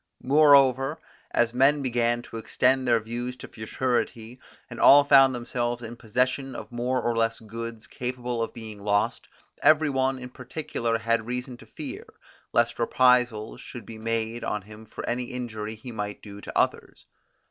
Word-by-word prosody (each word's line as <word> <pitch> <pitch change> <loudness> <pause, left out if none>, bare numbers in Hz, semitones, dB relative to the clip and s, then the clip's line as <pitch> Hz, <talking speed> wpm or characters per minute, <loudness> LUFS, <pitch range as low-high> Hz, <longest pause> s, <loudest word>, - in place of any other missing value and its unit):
Moreover, 140 0 +5 0.3
as 120 0 +1
men 140 +3 +3
began 120 -1 0
to 115 - -9
extend 130 +3 +1
their 115 -1 +4
views 120 +3 -5
to - - -10
futurity, 120 +1 -3 0.3
and - - -9
all 145 +1 +8
found 135 -2 +6
themselves 120 0 -3
in 115 +1 -7
possession 125 +4 -1
of - - -8
more 125 +2 -1
or 120 -1 -1
less 115 0 0
goods 115 0 -7
capable 125 -1 -4
of 115 - -2
being 110 -3 -9
lost, 105 0 0 0.3
every 155 -1 +5
one 135 0 +1
in 125 -1 -8
particular 125 -3 -3
had 115 0 0
reason 125 +1 -4
to - - -16
fear, - - -8 0.4
lest 120 0 +1
reprisals 120 -2 +2
should 120 -4 -9
be 110 +1 -10
made 115 +1 -2
on 105 -2 -2
him 110 +2 -13
for - - -7
any 125 +1 -1
injury 110 -4 -5
he 115 +3 -9
might 105 -2 -5
do 100 -1 -10
to - - -6
others. - - -1
120 Hz, 165 wpm, -26 LUFS, 115-130 Hz, 0.4 s, all